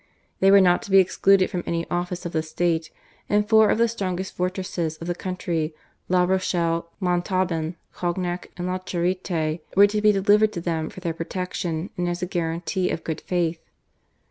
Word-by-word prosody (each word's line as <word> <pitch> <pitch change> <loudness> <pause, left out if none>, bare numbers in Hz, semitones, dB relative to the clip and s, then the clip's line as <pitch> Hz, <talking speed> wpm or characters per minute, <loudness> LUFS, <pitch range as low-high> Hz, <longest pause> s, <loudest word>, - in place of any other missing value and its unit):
They 195 - +5
were 200 0 +8
not 180 -1 +4
to - - -10
be 195 - +6
excluded 190 0 +4
from 180 - -2
any 170 0 -1
office 175 +1 -2
of 170 - -3
the 160 - 0
state, 165 +1 -1 0.4
and 210 0 +2
four 220 -1 +6
of - - +2
the 235 +1 +4
strongest 190 -4 -3
fortresses 180 -3 -2
of 165 - -8
the 175 - -1
country, 170 -3 -3 0.3
La 180 0 +4
Rochelle, 170 -2 0
Montauban, 180 -2 0 0.2
Cognac, 175 0 -3
and 175 - -3
La 185 +1 -1
Charite 175 -3 -1 0.2
were 200 +1 +8
to 210 +1 0
be 210 0 +6
delivered 210 +2 +3
to - - -3
them 160 -2 -2
for 185 - -11
their 170 -2 -2
protection 175 0 -4
and 175 0 0
as 175 0 -3
a - - +2
guarantee 175 +1 -2
of 160 - -3
good 160 - -4
faith. 170 -2 -1
180 Hz, 185 wpm, -24 LUFS, 170-190 Hz, 0.4 s, were